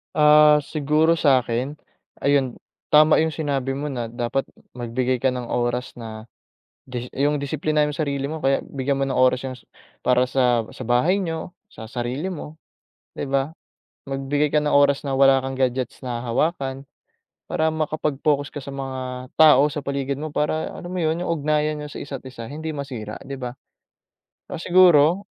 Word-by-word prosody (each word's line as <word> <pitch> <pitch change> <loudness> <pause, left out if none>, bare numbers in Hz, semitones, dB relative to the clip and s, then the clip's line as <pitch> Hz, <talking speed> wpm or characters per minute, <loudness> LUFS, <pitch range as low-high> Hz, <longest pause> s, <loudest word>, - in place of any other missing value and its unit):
Ah, 150 0 +6
siguro 155 +3 +1
sa'kin 130 -1 +2 0.5
ayun, 140 -3 +2 0.4
tama 155 +1 +7
yung 160 0 +1
sinabi 140 -4 -1
mo 145 +2 -3
na 120 -3 -3
dapat 120 +3 -2 0.3
magbigay 125 +2 -1
ka 130 +1 +1
ng 125 -2 -5
oras 120 +1 -2
na 110 -1 -9 0.6
dis 125 -1 -6
yung 145 +1 +1
disiplinahin 150 +1 0
mo 145 - -5
yung - - -4
sarili 140 -1 -2
mo 160 - -4
kaya 135 0 +3
bigyan 135 0 -2
mo 135 - 0
ng 130 - -2
oras 130 0 +4
yung 130 - -7
s - - -21 0.4
para 125 0 +4
sa 120 -4 +2
sa 130 - -6
bahay 125 - +2
niyo, 165 +2 -5 0.2
sa 110 -1 -10
sarili 125 +7 -3
mo, 160 -3 -8 0.5
di 140 - -5
ba? 135 +3 0 0.6
Magbigay 140 +2 0
ka 150 - +3
ng 150 - +1
oras 140 0 +4
na 135 - -2
wala 135 0 +5
kang 135 - -3
gadgets 130 -1 -1
na 125 -2 -4
hahawakan 135 +1 -1 0.6
para 160 0 0
makapag-focus 150 -2 -1
ka - - -8
sa 140 0 -8
mga 130 -2 -5
tao 150 -2 +7
sa 150 - -3
paligid 140 -1 -2
mo 155 0 -5
para 155 +2 -1
alam 175 - -8
mo 185 - -4
yun, 160 +1 0
yung - - -3
ugnayan 150 -1 0
niyo 150 - -6
sa - - -6
isa't 135 -2 -7
isa 120 -3 -8
hindi 155 +2 -5
masira, 125 -7 -6
di 135 0 -7
ba? 125 -1 -5 1.0
Ah, - - -4
siguro, 175 0 +5
140 Hz, 175 wpm, -23 LUFS, 130-150 Hz, 1.0 s, tama